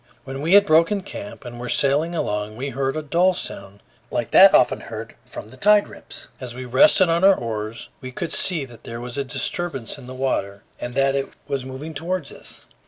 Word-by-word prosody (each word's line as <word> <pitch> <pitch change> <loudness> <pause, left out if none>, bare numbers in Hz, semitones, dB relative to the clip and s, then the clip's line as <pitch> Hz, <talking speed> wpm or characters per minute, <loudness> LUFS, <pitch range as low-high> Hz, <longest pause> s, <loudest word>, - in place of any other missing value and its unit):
When 135 +1 -6
we 165 +6 +4
had 205 0 +7
broken 170 +4 +3
camp 200 -6 -9
and 120 -1 -8
were 125 0 -5
sailing 150 +5 +1
along, 105 -6 -2
we 135 +3 -3
heard 135 0 -2
a 155 - -3
dull 175 +5 +2
sound 100 -7 -6 0.3
like - - -2
that - - +9
often - - +4
heard - - -8
from 105 - -9
the 130 - -14
tide 210 +3 +5
rips. - - -9
As 125 -2 -7
we 130 0 -6
rested 175 +9 +5
on 170 +2 +1
our 195 0 +7
oars, 110 -3 -5
we 130 -1 -7
could 165 +6 -4
see 165 -7 +1
that 120 -3 -15
there 115 0 -7
was 120 0 -6
a - - 0
disturbance 135 -1 -4
in 125 - -12
the 130 - -8
water 100 -7 -2 0.2
and 120 0 -6
that 135 0 +3
it 135 0 -1 0.2
was 140 -3 -2
moving 135 +5 -7
toward 165 +1 -3
us. - - -9
135 Hz, 215 wpm, -22 LUFS, 120-165 Hz, 0.3 s, that